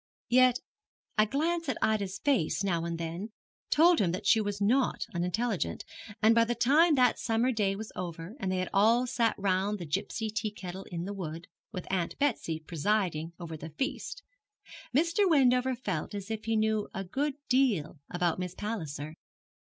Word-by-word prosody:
Yet 255 0 +5 0.6
a 215 - +5
glance 325 +5 0
at - - -1
Ida's 200 -3 0
face 200 - +1
now 170 -4 0
and 170 0 -3
then 170 +5 -4 0.4
told 335 +3 +5
him 180 -4 +2
that 185 - -4
she 220 - +5
was 205 -1 -3
not 245 +6 +2
unintelligent, 185 +4 -1 0.4
and 220 +1 +7
by 230 0 +5
the 240 +1 -1
time 300 +7 +4
that 250 -3 +3
summer 230 +3 +1
day 205 -4 +1
was 220 +2 -7
over, 170 +3 -6
and 190 - -1
they 185 -1 -1
all 225 +5 +4
sat 235 -3 +1
round 195 +1 0
the 175 - -6
gipsy 205 +7 -2
tea 215 0 -1
kettle 190 -2 -8
in 170 -1 -5
the 200 - -4
wood, 165 -4 -6 0.3
with 180 - -6
Aunt 180 -3 -1
Betsy 225 - 0
presiding 170 0 -1
over 165 -2 -6
the 155 +1 -8
feast, 385 - -3 0.7
Mr. 335 +8 +3
Wendover 260 -4 +4
felt 195 -7 -3
as 200 +2 -6
if 220 -1 -4
he 225 0 +1
knew 215 -1 +1
a 195 - -2
good 275 +9 -2
deal 230 - +2
about 175 -1 0
Miss 180 -1 -4
Palliser. 155 -9 -4
210 Hz, 175 wpm, -30 LUFS, 180-245 Hz, 0.7 s, and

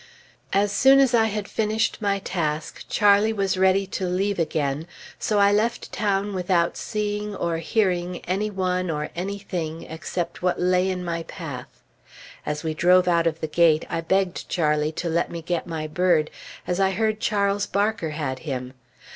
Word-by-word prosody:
As 200 +1 +2
soon 270 +6 +6
as 265 -3 +4
I 225 -2 +5
had 210 -1 -3
finished 220 +1 0
my 200 -1 +1
task, 160 -5 -3
Charlie 205 +1 +4
was 195 -3 0
ready 190 +1 +3
to 190 -1 -3
leave 190 +2 0
again; 155 -1 -1 0.3
so 210 - 0
I 200 0 +5
left 220 +3 0
town 205 -1 0
without 180 -2 +1
seeing, 210 -1 -3
or 170 -3 -1
hearing, 180 -1 0
any 195 +4 -1
one, 185 -2 -1
or 150 -1 -3
any 195 +4 -3
thing, 165 -5 -5
except 170 +1 -5
what 180 0 0
lay 180 +1 +2
in 180 -1 -3
my 170 -1 -2
path. 145 -7 -8 0.6
As 150 0 -2
we 160 -1 -1
drove 180 +3 +4
out 170 -1 +3
of 165 0 -2
the 160 - -1
gate, 155 0 +3
I 165 -1 -1
begged 190 +1 0
Charlie 150 -2 +1
to 175 - -3
let 170 +1 0
me 170 -1 -6
get 175 +1 -2
my 160 -2 -4
bird, 160 -1 +2 0.3
as 180 +1 -1
I 190 0 +3
heard 215 +2 0
Charles 200 -1 +1
Barker 205 -4 0
had 145 -4 -3
him. 130 -4 -5
180 Hz, 175 wpm, -24 LUFS, 165-200 Hz, 0.6 s, soon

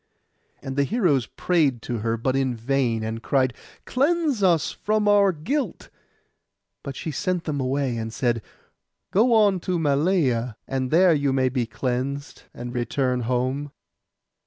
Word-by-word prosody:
And 135 +1 -5
the 140 - +4
heroes 150 - +1
prayed 145 -10 0
her, 115 -1 -1
but 130 +3 -1
in 130 -2 0
vain, 120 -1 0
and 110 +1 -4
cried, 130 -1 +1 0.3
'Cleanse 295 -2 +1
us 175 -5 +3
from 215 0 0
our 205 -1 +5
guilt!' 210 - -3 0.9
But 140 - -6
she 160 - -4
sent 180 +3 -1
them 145 -4 -2
away, 130 -1 -1
and 110 0 -4
said, 120 -1 0 0.7
'Go 225 +6 +3
on 205 -4 +4
to 180 +1 -2
Malea, 140 - +1
and 130 -1 -2
there 175 +3 +5
you 140 -2 +1
may 130 -1 +2
be 125 -2 -1
cleansed, 130 +5 -3
and 120 0 -7
return 125 +1 0
home. 130 +4 -1
140 Hz, 145 wpm, -24 LUFS, 125-180 Hz, 0.9 s, our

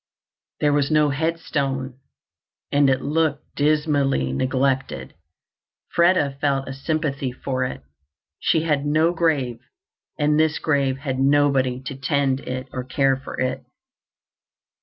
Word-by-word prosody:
There 145 -1 +3
was 145 -1 +2
no 150 -2 +3
headstone, 140 -4 -2 0.7
and 145 -1 +4
it 130 - +1
looked 150 0 -1
dismally 145 - +1
neglected. 130 - -1 0.8
Freda 170 -6 +3
felt 135 -2 0
a 135 - -5
sympathy 140 -2 -2
for 130 +1 -3
it. 125 - -6 0.6
She 160 - +2
had 150 -4 +1
no 155 +3 +2
grave, 145 -9 0 0.6
and 150 0 +2
this 160 -1 +2
grave 140 -4 +1
had 135 -2 -3
nobody 135 -2 +3
to 135 +1 -5
tend 135 0 0
it 130 0 -5
or 130 - -3
care 135 +1 +2
for 135 +1 -8
it. 130 0 -1
140 Hz, 125 wpm, -22 LUFS, 130-150 Hz, 0.8 s, and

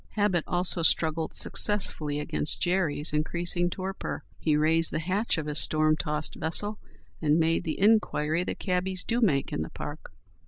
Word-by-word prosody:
Habit 205 -6 +1
also 175 0 +3
struggled 160 -1 +1
successfully 155 -8 0
against 150 0 -1
Jerry's 165 -5 0
increasing 175 +3 +1
torpor. 190 +2 -5 0.2
He 155 -2 +1
raised 160 +2 +3
the - - -2
hatch 190 +7 -1
of 160 - -3
his 150 0 -1
storm 155 0 +3
tossed 150 -1 -3
vessel 205 +7 0 0.4
and 150 0 +2
made 165 +2 +1
the 160 - -3
inquiry 180 -6 +2
that - - -4
cabbies 185 0 -2
do 240 +1 -1
make 145 - +1
in - - -2
the 80 - -4
park. - - -8
165 Hz, 160 wpm, -27 LUFS, 155-185 Hz, 0.4 s, also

